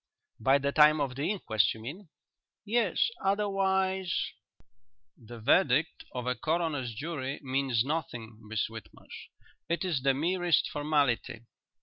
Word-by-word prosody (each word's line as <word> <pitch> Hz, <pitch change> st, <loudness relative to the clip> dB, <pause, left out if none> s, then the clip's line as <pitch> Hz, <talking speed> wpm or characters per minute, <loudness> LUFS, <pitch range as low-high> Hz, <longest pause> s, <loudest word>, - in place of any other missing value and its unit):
"By 135 Hz, +5 st, +4 dB
the 140 Hz, 0 st, -1 dB
time 150 Hz, +1 st, +6 dB
of 140 Hz, -3 st, -1 dB
the 140 Hz, +6 st, -2 dB
inquest, 110 Hz, -, +1 dB
you -, -, -11 dB
mean?" 155 Hz, -, -8 dB, 0.6 s
"Yes. 225 Hz, -2 st, +1 dB
Otherwise 190 Hz, -2 st, 0 dB, 0.4 s
" 115 Hz, -1 st, -51 dB
"The 120 Hz, 0 st, -9 dB
verdict 145 Hz, -, +2 dB
of 125 Hz, -2 st, -4 dB
a 125 Hz, -, +1 dB
coroner's 150 Hz, -4 st, -1 dB
jury 140 Hz, 0 st, -4 dB
means 130 Hz, -3 st, +1 dB
nothing, 120 Hz, -8 st, -4 dB
Miss 110 Hz, 0 st, -2 dB
Whitmarsh. 110 Hz, 0 st, -11 dB, 0.4 s
It 170 Hz, +3 st, 0 dB
is 165 Hz, -8 st, 0 dB
the 135 Hz, 0 st, +3 dB
merest 175 Hz, +2 st, +1 dB
formality." 145 Hz, -6 st, 0 dB
140 Hz, 130 wpm, -29 LUFS, 120-175 Hz, 0.6 s, time